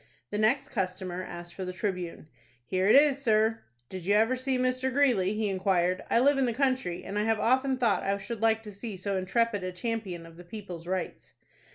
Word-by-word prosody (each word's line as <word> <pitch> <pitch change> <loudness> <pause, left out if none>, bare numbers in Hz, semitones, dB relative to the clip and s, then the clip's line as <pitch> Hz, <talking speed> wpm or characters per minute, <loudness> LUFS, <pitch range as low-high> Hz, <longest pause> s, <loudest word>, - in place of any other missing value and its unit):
The 210 - -2
next 270 +7 +2
customer 185 -4 -3
asked 175 -1 -8
for 190 - -6
the 185 - -4
"Tribune." 180 -4 -4 0.4
"Here 185 +5 0
it - - +7
is, 280 -1 +5
sir." 220 -2 +2 0.3
"Did 185 +4 -7
you 200 +4 +2
ever 225 +4 +3
see 260 0 -1
Mr. 255 +1 0
Greeley?" 240 -8 +3
he 215 0 -1
inquired. 185 -2 +1
"I - - +4
live 275 +2 +4
in 260 - +2
the 235 - 0
country, 255 -8 0
and 200 +2 -3
I - - +1
have 225 -1 +1
often 260 +3 +2
thought 235 -5 +2
I 200 +1 0
should 210 +3 -6
like 225 0 +3
to 210 - -8
see 200 0 -7
so 195 +2 -2
intrepid 205 +2 0
a 185 - -3
champion 185 -3 -4
of 165 0 -14
the 175 - -11
people's 175 -3 -8
rights." 185 -1 -4
210 Hz, 215 wpm, -28 LUFS, 185-240 Hz, 0.4 s, it